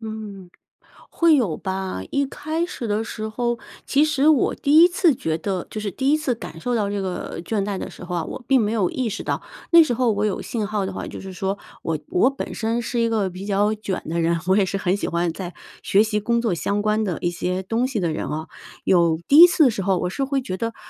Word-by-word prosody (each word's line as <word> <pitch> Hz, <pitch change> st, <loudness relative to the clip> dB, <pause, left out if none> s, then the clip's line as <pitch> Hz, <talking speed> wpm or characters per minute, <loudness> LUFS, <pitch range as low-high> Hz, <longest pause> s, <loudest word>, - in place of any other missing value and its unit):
嗯， 215 Hz, -4 st, -8 dB, 0.6 s
会 335 Hz, -2 st, +4 dB
有 200 Hz, -, 0 dB
吧， 190 Hz, -, -4 dB
一 280 Hz, 0 st, +1 dB
开 315 Hz, +5 st, -3 dB
始 245 Hz, -9 st, -6 dB
的 210 Hz, +1 st, 0 dB
时 215 Hz, -1 st, -5 dB
候， 240 Hz, +1 st, -1 dB, 0.3 s
其 285 Hz, +2 st, +3 dB
实 300 Hz, -1 st, +2 dB
我 300 Hz, -5 st, +3 dB
第 285 Hz, +2 st, +2 dB
1 345 Hz, -, +9 dB
次 345 Hz, -3 st, +3 dB
觉 160 Hz, -8 st, -2 dB
得 185 Hz, +1 st, -3 dB
就 215 Hz, -, -5 dB
是 205 Hz, -1 st, -3 dB
第 265 Hz, +7 st, 0 dB
1 305 Hz, -, +4 dB
次 270 Hz, -5 st, 0 dB
感 165 Hz, -, -9 dB
受 245 Hz, +6 st, -1 dB
到 205 Hz, -3 st, 0 dB
这 205 Hz, -, -2 dB
个 180 Hz, -2 st, -4 dB
倦 200 Hz, +3 st, -1 dB
怠 200 Hz, -2 st, -3 dB
的 -, -, -5 dB
时 -, -, -11 dB
候 180 Hz, 0 st, -5 dB
啊， 165 Hz, -, -1 dB
我 245 Hz, -, -7 dB
并 270 Hz, -2 st, +5 dB
没 215 Hz, -1 st, 0 dB
有 205 Hz, -6 st, +1 dB
意 255 Hz, -3 st, -2 dB
识 215 Hz, -, -4 dB
到。 -, -, -1 dB, 0.3 s
那 335 Hz, -1 st, +9 dB
时 255 Hz, -6 st, 0 dB
候 240 Hz, -2 st, +2 dB
我 205 Hz, +1 st, -1 dB
有 205 Hz, -, -2 dB
信 220 Hz, -3 st, -3 dB
号 205 Hz, -1 st, -1 dB
的 -, -, -4 dB
话 -, -, -5 dB
就 -, -, -8 dB
是 190 Hz, 0 st, -8 dB
说， 195 Hz, +2 st, -2 dB, 0.3 s
我 160 Hz, -1 st, -1 dB
我 210 Hz, -, +3 dB
本 275 Hz, -, -6 dB
身 230 Hz, +1 st, -1 dB
是 240 Hz, +1 st, -2 dB
一 230 Hz, -, +2 dB
个 210 Hz, -4 st, 0 dB
比 185 Hz, +3 st, -8 dB
较 205 Hz, +1 st, +2 dB
卷 205 Hz, -3 st, -4 dB
的 170 Hz, +2 st, -1 dB
人， 170 Hz, +1 st, +1 dB
我 190 Hz, -, +4 dB
也 200 Hz, -, +3 dB
是 195 Hz, -, -2 dB
很 185 Hz, -1 st, +1 dB
喜 -, -, -3 dB
欢 170 Hz, 0 st, 0 dB
在 180 Hz, 0 st, -7 dB, 0.3 s
学 200 Hz, +2 st, +4 dB
习 215 Hz, -1 st, -1 dB
工 235 Hz, +2 st, +1 dB
作 225 Hz, -6 st, +1 dB
相 200 Hz, +4 st, -1 dB
关 215 Hz, +1 st, +1 dB
的 180 Hz, -5 st, -2 dB
一 175 Hz, -, 0 dB
些 180 Hz, +2 st, -2 dB
东 230 Hz, +6 st, 0 dB
西 260 Hz, -4 st, -3 dB
的 170 Hz, -3 st, 0 dB
人 -, -, -3 dB
哦， 155 Hz, +1 st, -4 dB, 0.4 s
有 170 Hz, -3 st, +3 dB
第 285 Hz, -, +6 dB
1 345 Hz, -, +12 dB
次 340 Hz, -3 st, +3 dB
的 260 Hz, -, +5 dB
时 205 Hz, -, -4 dB
候， 190 Hz, -1 st, +1 dB
我 180 Hz, -, -2 dB
是 275 Hz, +8 st, -2 dB
会 275 Hz, 0 st, -1 dB
觉 185 Hz, -6 st, -4 dB
得， 230 Hz, 0 st, -3 dB
210 Hz, 275 characters per minute, -22 LUFS, 185-245 Hz, 0.6 s, 1